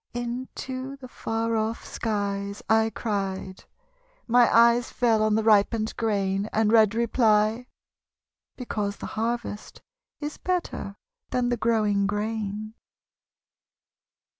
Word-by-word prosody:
Into 255 Hz, +2 st, -5 dB
the 265 Hz, -2 st, -10 dB
far 225 Hz, -1 st, -2 dB
off 220 Hz, +1 st, -2 dB
skies 200 Hz, -2 st, -3 dB
I 220 Hz, 0 st, +3 dB
cried. 195 Hz, -4 st, -4 dB, 0.6 s
My 240 Hz, 0 st, +5 dB
eyes 235 Hz, +1 st, +5 dB
fell 230 Hz, -3 st, +2 dB
on 215 Hz, 0 st, +2 dB
the 220 Hz, -, +1 dB
ripened 215 Hz, +1 st, +3 dB
grain, 200 Hz, -2 st, 0 dB
And 220 Hz, -1 st, +2 dB
read 220 Hz, -1 st, +5 dB
reply: 225 Hz, 0 st, +2 dB, 0.9 s
because 210 Hz, -5 st, -3 dB
the -, -, -7 dB
harvest 230 Hz, -1 st, -3 dB, 0.4 s
Is 295 Hz, 0 st, -5 dB
better 355 Hz, -, -3 dB, 0.3 s
than 245 Hz, -1 st, 0 dB
the 245 Hz, -, +1 dB
growing 210 Hz, -3 st, +2 dB
grain. 210 Hz, 0 st, -3 dB
220 Hz, 110 wpm, -26 LUFS, 210-235 Hz, 0.9 s, My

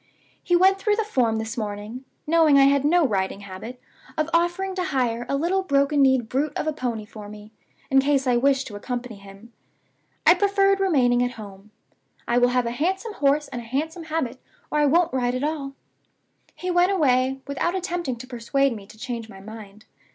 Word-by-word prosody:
He 355 Hz, -, +1 dB
went 380 Hz, +2 st, +4 dB
through 415 Hz, +1 st, +1 dB
the 445 Hz, -, 0 dB
form 250 Hz, -, +1 dB
this 220 Hz, +1 st, -4 dB
morning 215 Hz, +3 st, -5 dB, 0.2 s
(knowing 315 Hz, -2 st, +4 dB
I 275 Hz, -, +7 dB
had 280 Hz, 0 st, +4 dB
no 330 Hz, +2 st, +4 dB
riding 195 Hz, -2 st, -2 dB
habit) 200 Hz, +6 st, -9 dB, 0.4 s
of 310 Hz, +1 st, -1 dB
offering 350 Hz, +3 st, +1 dB
to 365 Hz, -1 st, -2 dB
hire 240 Hz, -7 st, -1 dB
a 275 Hz, -, +1 dB
little 355 Hz, +6 st, +1 dB
broken 280 Hz, -3 st, +2 dB
kneed 260 Hz, -4 st, +3 dB
brute 285 Hz, +5 st, -1 dB
of -, -, -2 dB
a 310 Hz, -, -1 dB
pony 240 Hz, -6 st, -4 dB
for 210 Hz, -1 st, -11 dB
me, 210 Hz, 0 st, -12 dB, 0.4 s
in 270 Hz, -, +6 dB
case 275 Hz, 0 st, +1 dB
I 250 Hz, -1 st, +2 dB
wished 270 Hz, +2 st, +2 dB
to 210 Hz, -, -9 dB
accompany 245 Hz, +1 st, -5 dB
him! 200 Hz, +4 st, -15 dB, 0.7 s
I -, -, +8 dB
preferred 395 Hz, +1 st, +2 dB
remaining 260 Hz, -11 st, +3 dB
at 245 Hz, 0 st, 0 dB
home. 205 Hz, -2 st, -11 dB, 0.6 s
I 240 Hz, +1 st, +2 dB
will 245 Hz, 0 st, +4 dB
have 250 Hz, -1 st, +1 dB
a 235 Hz, -, -2 dB
handsome 380 Hz, -, -2 dB
horse 295 Hz, -2 st, +1 dB
and 245 Hz, -3 st, -5 dB
a -, -, -12 dB
handsome 320 Hz, +8 st, -3 dB
habit, 305 Hz, -6 st, -3 dB, 0.3 s
or 300 Hz, -, +1 dB
I 295 Hz, -, +4 dB
won't 335 Hz, +3 st, +2 dB
ride 250 Hz, -1 st, 0 dB
at 255 Hz, -, -3 dB
all. 290 Hz, -3 st, -3 dB, 0.8 s
He 365 Hz, 0 st, -3 dB
went 355 Hz, +2 st, +3 dB
away, 265 Hz, -6 st, +2 dB
without 280 Hz, +6 st, -2 dB
attempting 350 Hz, -7 st, -2 dB
to 240 Hz, +2 st, -10 dB
persuade 260 Hz, +1 st, 0 dB
me 200 Hz, -2 st, -11 dB
to 220 Hz, -, -15 dB
change 230 Hz, -1 st, -6 dB
my 195 Hz, -2 st, -12 dB
mind. 210 Hz, 0 st, -11 dB
270 Hz, 200 wpm, -24 LUFS, 230-325 Hz, 0.8 s, I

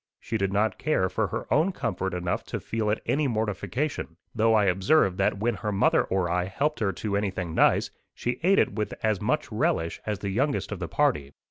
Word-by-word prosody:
She 115 Hz, -, -5 dB
did 100 Hz, -3 st, 0 dB
not 105 Hz, +2 st, +1 dB
care 95 Hz, -12 st, +1 dB
for 105 Hz, +3 st, 0 dB
her -, -, -4 dB
own 160 Hz, +6 st, +3 dB
comfort 115 Hz, -, -3 dB
enough 90 Hz, 0 st, -2 dB
to -, -, -4 dB
feel 110 Hz, -2 st, -2 dB
it 105 Hz, -, -1 dB
any 150 Hz, 0 st, +1 dB
mortification; 110 Hz, -, -2 dB, 0.2 s
though 115 Hz, 0 st, +3 dB
I 105 Hz, -2 st, +4 dB
observed 95 Hz, -, +3 dB
that -, -, +2 dB
when 115 Hz, +4 st, 0 dB
her 105 Hz, -, -3 dB
mother 100 Hz, -, +3 dB
or 95 Hz, -2 st, 0 dB
I 90 Hz, +1 st, 0 dB
helped 140 Hz, +11 st, -1 dB
her 105 Hz, -4 st, +1 dB
to 100 Hz, +3 st, -3 dB
anything 95 Hz, -4 st, -2 dB
nice, -, -, +3 dB, 0.2 s
she 120 Hz, +1 st, -2 dB
ate 190 Hz, +4 st, +4 dB
it -, -, +3 dB
with 105 Hz, -1 st, -3 dB
as 110 Hz, -3 st, +1 dB
much -, -, -1 dB
relish 80 Hz, 0 st, 0 dB
as 105 Hz, -1 st, -1 dB
the 100 Hz, +1 st, -4 dB
youngest 135 Hz, +6 st, 0 dB
of 105 Hz, -, -4 dB
the 90 Hz, -, -3 dB
party. 80 Hz, -, 0 dB
105 Hz, 215 wpm, -26 LUFS, 95-120 Hz, 0.2 s, I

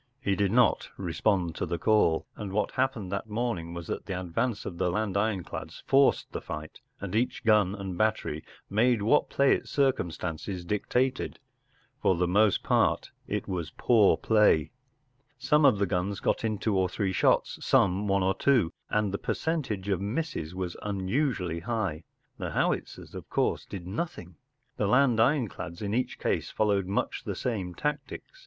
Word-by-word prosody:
He 100 Hz, -6 st, 0 dB
did 100 Hz, -1 st, +1 dB
not 120 Hz, 0 st, +3 dB
respond 90 Hz, 0 st, 0 dB
to -, -, -2 dB
the 85 Hz, +1 st, -2 dB
call, 95 Hz, -4 st, +3 dB
and 105 Hz, -3 st, -6 dB
what 105 Hz, +2 st, 0 dB
happened 125 Hz, -8 st, -1 dB
that 100 Hz, +2 st, -3 dB
morning 105 Hz, -7 st, -2 dB
was 85 Hz, -1 st, -6 dB
that -, -, -5 dB
the 95 Hz, -2 st, -3 dB
advance 105 Hz, +6 st, -2 dB
of 85 Hz, -, -6 dB
the 90 Hz, -, +2 dB
land 105 Hz, +1 st, -1 dB
ironclads 100 Hz, -3 st, -3 dB
forced 135 Hz, 0 st, +3 dB
the -, -, -4 dB
fight, 75 Hz, 0 st, -7 dB, 0.2 s
and 100 Hz, -1 st, -6 dB
each 120 Hz, +3 st, 0 dB
gun 105 Hz, -3 st, +4 dB
and 95 Hz, -3 st, -5 dB
battery 110 Hz, -8 st, 0 dB, 0.2 s
made 115 Hz, +1 st, +2 dB
what 130 Hz, +8 st, +3 dB
play 140 Hz, 0 st, +4 dB
its -, -, -3 dB
circumstances 90 Hz, -, -1 dB
dictated. 125 Hz, +7 st, -1 dB, 0.6 s
For 95 Hz, -, +3 dB
the 90 Hz, +1 st, +1 dB
most 100 Hz, +2 st, +3 dB
part -, -, +1 dB, 0.2 s
it -, -, -3 dB
was 85 Hz, -4 st, -3 dB
poor 110 Hz, -5 st, +4 dB
play. 105 Hz, -9 st, +3 dB, 0.7 s
Some 150 Hz, +4 st, +3 dB
of 130 Hz, -7 st, +6 dB
the 100 Hz, -, +2 dB
guns 95 Hz, +1 st, -1 dB
got -, -, 0 dB
in 110 Hz, -2 st, 0 dB
two 105 Hz, 0 st, 0 dB
or 95 Hz, -1 st, +2 dB
three 95 Hz, 0 st, -1 dB
shots, -, -, +2 dB
some 100 Hz, +2 st, +3 dB
one 100 Hz, -1 st, +2 dB
or 95 Hz, +1 st, +2 dB
two, 115 Hz, -8 st, +2 dB, 0.2 s
and 105 Hz, -2 st, 0 dB
the 100 Hz, -, -2 dB
percentage 130 Hz, -, -2 dB
of 95 Hz, -3 st, 0 dB
misses 100 Hz, -, -3 dB
was 90 Hz, -2 st, -3 dB
unusually 100 Hz, -, -1 dB
high. 90 Hz, -5 st, -3 dB, 0.3 s
The -, -, -3 dB
howitzers, -, -, -2 dB
of -, -, -9 dB
course, -, -, 0 dB
did 95 Hz, -4 st, -7 dB
nothing. 90 Hz, -, -5 dB, 0.4 s
The 105 Hz, -, +1 dB
land 125 Hz, 0 st, +4 dB
ironclads 110 Hz, -, 0 dB
in 105 Hz, -1 st, -3 dB
each 125 Hz, +2 st, -1 dB
case -, -, -1 dB
followed 100 Hz, -3 st, +1 dB
much 100 Hz, -, -2 dB
the -, -, -4 dB
same 95 Hz, -8 st, -3 dB
tactics. 150 Hz, -, -4 dB
100 Hz, 170 wpm, -28 LUFS, 90-115 Hz, 0.7 s, of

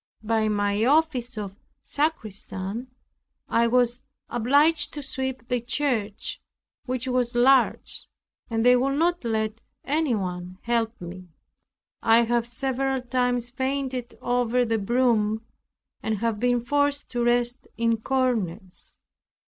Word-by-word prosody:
By 220 Hz, 0 st, +1 dB
my 205 Hz, 0 st, +1 dB
office 260 Hz, -4 st, +2 dB
of 200 Hz, -2 st, -5 dB, 0.3 s
sacristan 225 Hz, -6 st, -3 dB, 0.6 s
I 235 Hz, 0 st, +3 dB
was 245 Hz, 0 st, +2 dB, 0.3 s
obliged 290 Hz, +7 st, +3 dB
to 290 Hz, -, -5 dB
sweep 260 Hz, -2 st, -4 dB
the 245 Hz, -1 st, 0 dB
church, 240 Hz, -5 st, -2 dB, 0.5 s
which 255 Hz, 0 st, -2 dB
was 250 Hz, -1 st, 0 dB
large, 260 Hz, +2 st, +3 dB, 0.4 s
and 225 Hz, 0 st, 0 dB
they 250 Hz, 0 st, +7 dB
would 275 Hz, +3 st, +1 dB
not 345 Hz, +1 st, +1 dB
let 220 Hz, -1 st, -1 dB, 0.2 s
anyone 190 Hz, -, -1 dB
help 230 Hz, -1 st, 0 dB
me. 180 Hz, +1 st, -8 dB, 0.7 s
I 230 Hz, +1 st, +5 dB
have 235 Hz, 0 st, +1 dB
several 265 Hz, +1 st, -1 dB
times 245 Hz, -1 st, 0 dB
fainted 260 Hz, -1 st, -3 dB
over 245 Hz, 0 st, +2 dB
the 225 Hz, -1 st, 0 dB
broom 220 Hz, -1 st, +1 dB, 0.6 s
and 220 Hz, -1 st, -1 dB
have 225 Hz, 0 st, -1 dB
been 245 Hz, 0 st, +2 dB
forced 285 Hz, +3 st, +1 dB
to 240 Hz, -1 st, -1 dB
rest 240 Hz, +1 st, +1 dB
in 230 Hz, 0 st, +2 dB
corners. 220 Hz, -7 st, -2 dB
240 Hz, 120 wpm, -25 LUFS, 220-260 Hz, 0.7 s, they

